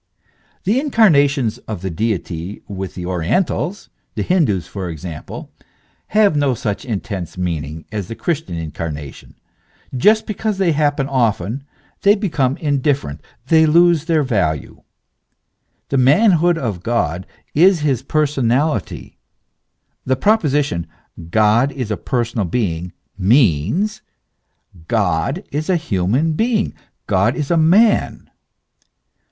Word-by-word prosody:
The 215 +7 +2
incarnations 145 - +3
of 105 -5 -5
the 95 - -2
Deity 95 -2 -3
with 95 -3 -6
the 90 - -5
orientals 150 - -1 0.3
the - - -1
Hin 180 -3 +3
doos 95 -7 -1
for 95 -3 -6
example, 80 -1 -8 0.6
have 210 -5 +3
no 140 -3 +2
such 105 -3 -3
intense 100 -7 -5
meaning 80 -3 -4
as 105 -4 -4
the 115 - -6
Chris 160 +2 -1
tian 85 - -7
incarnation; 75 -3 -7 0.6
just 215 - +4
because 215 -1 -2
they 190 -3 +2
happen 145 -2 +1
often 120 -1 -1 0.4
they 205 +1 +5
become 155 - 0
indifferent, 140 - -1 0.2
they 160 +2 +4
lose 170 0 +4
their 160 -3 +2
value. 90 - -1 1.1
The 135 - +1
manhood 170 - +4
of 110 - -3
God 95 -6 -1 0.3
is 175 +2 +4
his 135 -5 +1
personality; 140 - -1 0.8
the 130 - +1
proposition, 145 - +1 0.4
God 110 +7 +3
is 125 -6 -4
a - - +1
personal 120 -3 -2
being, 90 -4 -2 0.3
means: 115 - +2 0.9
God 110 - 0
is 150 +4 -3
a 185 - +3
human 130 - 0
being, 220 +4 0 0.3
God 100 +5 +2
is 150 0 -3
a - - +4
man. 195 +8 +3
130 Hz, 120 wpm, -18 LUFS, 95-160 Hz, 1.1 s, they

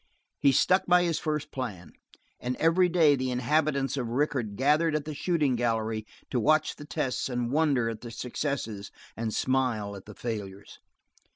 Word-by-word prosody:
He 140 - +5
stuck 185 +7 +3
by 180 0 +5
his 170 -2 0
first 150 -3 -3
plan. 105 -10 -5 0.5
And 125 +1 -2
every 170 +5 +3
day 165 -4 +5
the 130 -1 -2
inhabitants 140 +2 +1
of 125 -3 -2
Rickett 125 -5 -1
gathered 150 +6 +2
at 150 -1 -1
the 155 - -4
shooting 150 -4 +1
gallery 110 -2 -1 0.2
to 125 - +1
watch 155 +6 +2
the 145 - -9
tests 135 -3 -2
and 120 -1 -2
wonder 140 -6 +2
at 115 -1 -4
the 120 - -7
successes 115 -4 -4 0.3
and 110 -1 -3
smile 120 -6 0
at 95 - -11
the 105 - -11
failures. 100 -4 -6
130 Hz, 170 wpm, -28 LUFS, 115-150 Hz, 0.5 s, He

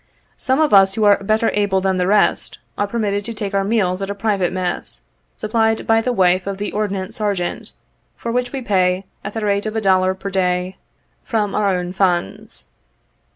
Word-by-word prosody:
Some 260 +2 0
of 310 -7 +2
us, 195 -1 +6
who 220 - 0
are 205 -1 +4
better 215 +3 +1
able 200 -2 +1
than 190 0 0
the 180 0 0
rest, 210 +2 +2 0.2
are 205 - -1
per 235 - -4
mitted 205 -2 -1
to 230 0 -5
take 205 -2 -4
our 195 0 +1
meals 195 -3 0
at 195 - -3
a 200 - -3
private 200 -4 0
mess, 180 - -3 0.3
supplied 220 0 0
by 225 0 +3
the 250 - -1
wife 185 -4 +2
of 200 -1 -3
the 205 +1 -3
Ordnance 200 0 -3
Sergeant, 200 -5 -2 0.4
for 235 - -4
which 245 +1 -1
we 270 -2 -5
pay, 185 -3 +1 0.2
at 200 - -6
the 220 -2 -3
rate 200 +1 0
of 215 - -4
a 220 - 0
dollar 185 -1 +3
per 195 +1 -6
day, 180 0 -1 0.5
from 210 -3 -1
our 200 -3 +1
own 180 0 -3
funds. 180 - -1
200 Hz, 200 wpm, -19 LUFS, 185-215 Hz, 0.5 s, us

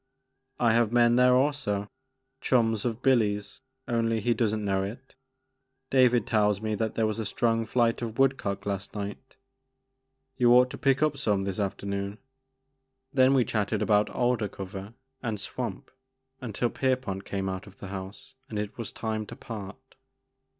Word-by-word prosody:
" - - -46
I - - +4
have 115 -1 +3
men 120 0 +5
there 125 0 +5
also, 130 -7 0 0.3
— 130 0 -51
chums 115 -4 +2
of 120 +1 -2
Billy's 105 -6 +1 0.3
only 115 -2 +1
he 120 +3 +2
does 115 -3 +1
n't 110 -1 -2
know 95 -1 +1
it. 115 +7 -7 0.8
David 125 -4 +4
tells 105 -2 +2
me 110 0 -2
that 110 +1 -2
there 110 - +2
was 110 +1 -1
a - - -1
strong 115 +2 0
flight 115 0 +2
of 115 -1 -4
woodcock 125 -8 +1
last 100 0 -4
night. 105 +5 -6 1.0
You 120 -1 +5
ought 125 0 +5
to - - -6
pick 135 +1 +3
up 150 -2 +1
some 105 -7 +1
this 95 0 -3
afternoon." 100 0 -3 1.0
Then 130 0 +5
we 125 -3 +4
chatted 105 0 0
about 105 -1 +3
alder 120 -3 +1
cover 95 +2 -8 0.3
and 110 -5 -3
swamp - - -5 0.5
until 120 0 -1
Pierpont 130 -8 -1
came 95 -1 -3
out 95 +2 -4
of 100 0 -15
the 100 - -8
house 95 +6 -8 0.2
and 110 - -4
it 105 +2 -4
was 115 - -4
time 110 -1 -3
to - - -8
part. 105 -3 -7
110 Hz, 170 wpm, -28 LUFS, 100-125 Hz, 1.0 s, men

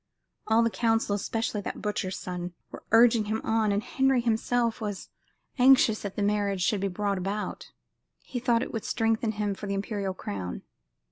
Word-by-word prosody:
All 220 +1 +4
the 230 - +1
council, 225 -3 +1
especially 220 +1 -2
that - - -5
butcher's 200 -3 -2
son, 180 -1 -5 0.2
were - - -9
urging 230 -1 +6
him 215 +1 -1
on, 220 -2 +1
and 200 +1 0
Henry 265 -1 +2
himself 235 0 0
was 205 -3 -5 0.5
anxious 250 -4 +5
that 200 -2 -5
the 205 - -1
marriage 200 -2 +1
should 200 0 +1
be 200 - +1
brought 200 +1 -1
about. 200 +3 -4 0.5
He 250 - -5
thought 240 -1 +2
it - - -7
would 225 - -3
strengthen 225 -1 0
him 210 -1 -1
for 205 +1 -7
the 200 - -1
imperial 195 -1 -3
crown. 95 - -5
210 Hz, 180 wpm, -27 LUFS, 200-230 Hz, 0.5 s, urging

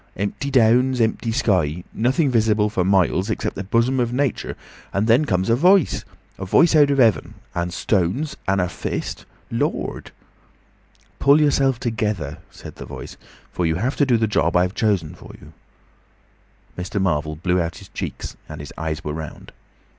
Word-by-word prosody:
Empty 100 +8 -3
downs, 125 0 +3
empty 115 0 0
sky. 90 - +1
Nothing 130 +5 +1
visible 110 -2 +2
for 95 -4 0
miles 95 +1 +2
except 110 - -2
the 95 - -4
bosom 115 +6 +1
of 120 -1 0
Nature. 135 -1 -1 0.3
And 100 +2 0
then 120 +7 +4
comes 95 -6 0
a 115 - +4
voice. 180 +4 +3 0.3
A 95 - -4
voice 165 - +4
out 145 -2 +6
of 140 - +1
heaven! 115 -6 +2 0.2
And 85 0 -2
stones! 95 - 0
And 95 0 +2
a 90 - +1
fist—Lord!" 85 - -4 1.1
"Pull 140 +2 +5
yourself 135 -4 +2
together," 105 - -2
said - - -12
the - - -8
Voice, - - -8 0.4
"for 90 - -2
you 80 -1 +1
have 120 +10 -1
to 145 - +4
do 120 -3 +4
the 110 - +1
job 90 -5 +1
I've 90 +1 +1
chosen 100 -10 0
for - - -13
you." - - -15 1.2
Mr. 95 +4 -3
Marvel 75 -5 0
blew 90 +3 0
out 85 0 -4
his - - -13
cheeks, - - -6
and - - -8
his 75 -2 -9
eyes 80 -1 -3
were 75 - -3
round. 80 -1 -8
105 Hz, 170 wpm, -21 LUFS, 90-125 Hz, 1.2 s, out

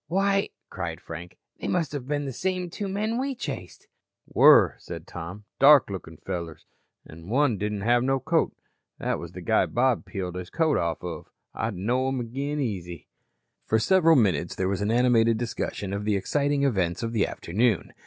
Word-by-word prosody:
"Why," 195 +4 +1 0.2
cried 85 -3 -4
Frank, 85 +2 -9 0.2
"they - - -4
must 170 -6 0
have 140 -4 -5
been 145 0 -1
the 135 - -4
same 185 +3 -2
two 205 - -4
men 215 +4 -1
we 270 +1 -2
chased." 135 - -7 0.4
"Were," - - +6
said - - -8
Tom. 90 +5 -8
"Dark 140 -5 +7
lookin' 80 -4 -7
fellers 85 -4 -6 0.4
an' 80 +3 -12
one 125 -4 +2
didn't 105 -1 -2
have 120 +3 +3
no 135 +1 +1
coat. 160 +4 +1 0.5
That - - -2
was 85 0 -8
the 90 - -8
guy 85 - +2
Bob 125 -3 +1
peeled 95 -1 -4
his 90 0 -6
coat 160 -3 +1
off 85 0 -2
of. 85 -3 -6 0.2
I'd 110 -3 -3
know 120 +8 0
'em 135 -1 -1
agin 135 +5 -3
easy." 90 - -4 0.6
For 110 - +3
several 165 - +4
minutes 95 - +2
there 95 - -1
was 100 0 -1
an 100 - 0
animated 115 -1 +3
discussion 110 -4 -3
of 100 +1 -3
the 105 -1 +1
exciting 140 +8 0
events 95 -8 0
of 115 0 -3
the 110 -3 +2
afternoon. 105 +3 0
115 Hz, 185 wpm, -26 LUFS, 90-145 Hz, 0.6 s, Dark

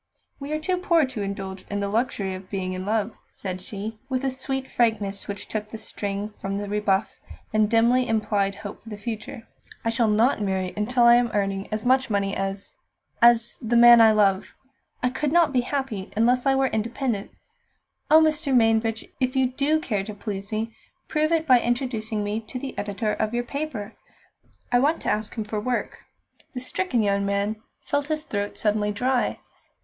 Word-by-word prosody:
"We 280 +1 -6
are 305 - +1
too 365 +4 0
poor 340 -4 +3
to 255 -5 -5
indulge 195 -1 -5
in 205 - -2
the 200 - -1
luxury 205 -3 -1
of 185 0 -9
being 185 -2 -3
in 185 +1 -5
love," 215 0 0 0.2
said 185 -2 -5
she, 215 +3 -6
with 260 0 -1
a 265 - +1
sweet 265 0 -3
frankness 210 -4 0
which 200 0 -6
took 210 -1 -4
the 225 - -7
sting 205 0 -4
from 195 +1 -2
the 205 0 -4
rebuff 205 -1 0 0.4
and 215 -1 +3
dimly 240 +2 +3
implied 205 -3 0
hope 205 0 -8
for 225 - -12
the 210 - -6
future. 225 +2 -6 0.4
"I - - +2
shall 230 0 +2
not 215 +3 +3
marry 190 -2 -1
until 240 +4 +1
I 235 0 +8
am 240 -1 +2
earning 195 -1 -1
as 215 +1 -3
much 260 +1 +3
money 200 -1 0
as 195 0 -4 0.4
as 235 0 +5
the 235 0 0
man 240 0 +9
I 220 -1 +7
love. 200 -3 +2 0.5
I 250 - +2
could 290 +2 -1
not 330 -3 +4
be 250 - +3
happy 245 -7 -3
unless 245 +4 +3
I 270 - +4
were 270 0 +3
independent. 230 -1 -2 0.8
Oh, 315 +1 +8
Mr. 305 -3 +2
Mainbridge! 225 -1 +2
if 255 0 0
you 260 -1 +2
do 290 +4 +1
care 210 -10 -2
to 210 +1 -7
please 200 -1 -6
me, 220 +1 -2 0.4
prove 310 +1 +1
it 325 -1 +2
by 255 -4 +6
introducing 235 -3 -2
me 205 +2 -2
to 225 +3 -7
the 265 +1 -6
editor 210 +1 -2
of 215 +2 -1
your 240 - 0
paper! 245 -5 -5 0.8
I 245 - +5
want 295 +5 +2
to - - +1
ask 215 0 -2
him 220 - -2
for 210 0 -3
work." 245 +3 -2 0.6
The - - -2
stricken 255 -2 -1
young 200 -1 +1
man 200 +2 0 0.2
felt 285 0 -1
his 310 0 -2
throat 205 -5 -3
suddenly 210 -1 +1
dry. 250 +4 0
225 Hz, 195 wpm, -25 LUFS, 205-255 Hz, 0.8 s, man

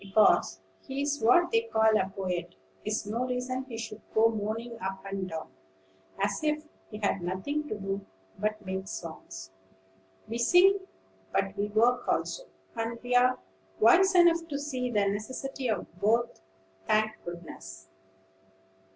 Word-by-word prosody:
Because 195 - +4 0.2
he 270 +1 -4
is 290 0 -1
what 345 +10 +5
they 460 0 +1
call 220 0 +4
a 190 -2 +2
poet 185 - -4 0.3
is 210 0 -1
no 225 +4 -1
reason 255 +1 -2
he 240 -4 -7
should 220 -1 -6
go 225 +1 +6
moaning 225 +2 -4
up 190 +1 -5
and 195 -1 -3
down, 160 -4 -6 0.7
as 200 +6 0
if 305 0 +1 0.3
he 210 - -7
had 200 -3 0
nothing 190 +13 -2
to 215 - -3
do 195 0 -3 0.4
but 215 0 -2
make 190 0 -4
songs. 160 - -7 0.8
We 230 +2 -4
sing, 360 +10 +6 0.5
but 195 0 0
we 205 0 -1
work 235 +4 +2
also; - - -1 0.3
and 230 +1 -2 0.2
are 250 +1 +5 0.4
wise 375 - +6
enough 335 -1 +5
to 290 -3 -3
see 260 -4 -2
the 205 -4 +2
necessity 255 +5 -3
of 210 -5 -1
both, 230 +4 +1 0.5
thank 215 0 +1
goodness!" 95 - -9
220 Hz, 145 wpm, -29 LUFS, 195-255 Hz, 0.8 s, go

